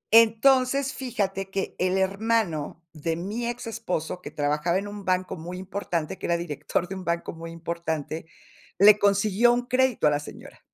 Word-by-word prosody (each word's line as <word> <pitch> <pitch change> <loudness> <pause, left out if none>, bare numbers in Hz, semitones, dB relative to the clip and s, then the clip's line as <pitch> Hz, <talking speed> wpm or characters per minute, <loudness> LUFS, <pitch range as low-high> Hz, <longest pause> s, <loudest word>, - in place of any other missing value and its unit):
Entonces, 255 +4 +5
fíjate 200 -7 -2
que 195 0 -3
el 185 +1 +2
hermano 190 -5 0
de 160 +1 -2
mi 210 +8 -3
exesposo, 225 -8 -3
que - - -7
trabajaba 150 +3 0
en 200 +1 -3
un 205 -1 -8
banco 185 0 0
muy 175 +3 -7
importante, 185 -3 -3
que - - -4
era 170 - +2
director 170 +1 -2
de 190 - -6
un 190 -1 -6
banco 170 -1 -2
muy 165 0 -8
importante, 165 -2 -4 0.5
le 210 +2 +8
consiguió 205 +3 +4
un 245 0 0
crédito 255 -4 +2
a 150 - +6
la 145 - +1
señora 150 - -11
190 Hz, 170 wpm, -26 LUFS, 170-225 Hz, 0.5 s, le